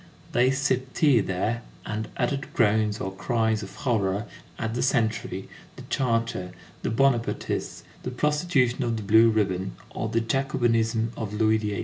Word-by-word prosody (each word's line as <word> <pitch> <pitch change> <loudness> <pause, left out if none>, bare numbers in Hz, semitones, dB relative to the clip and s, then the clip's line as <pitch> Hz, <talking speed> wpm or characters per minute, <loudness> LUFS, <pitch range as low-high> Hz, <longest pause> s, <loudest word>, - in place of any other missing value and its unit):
They 125 +2 +4
sipped 130 -1 0
tea 145 -7 +5
there, 105 +4 -1 0.2
and 105 +1 -3
uttered 135 +2 -1
groans 110 -2 +2
or 95 - -3
cries 110 0 0
of 100 - -9
horror 105 -5 0 0.3
at 110 -1 -2
the 120 - -1
century, 110 -6 0 0.3
the - - -10
charter, 115 -7 0 0.3
the - - -1
Bonapartists, 120 0 0 0.2
the - - -4
prostitution 145 -2 +1
of 115 -2 0
the 110 - -5
blue 110 +3 +6
ribbon, 95 -4 0 0.2
or - - -3
the 115 - +1
Jacobinism 115 -3 +1
of 110 -3 -4
Louis 110 0 +3
XVIII. 105 -2 -2
115 Hz, 150 wpm, -26 LUFS, 105-125 Hz, 0.3 s, blue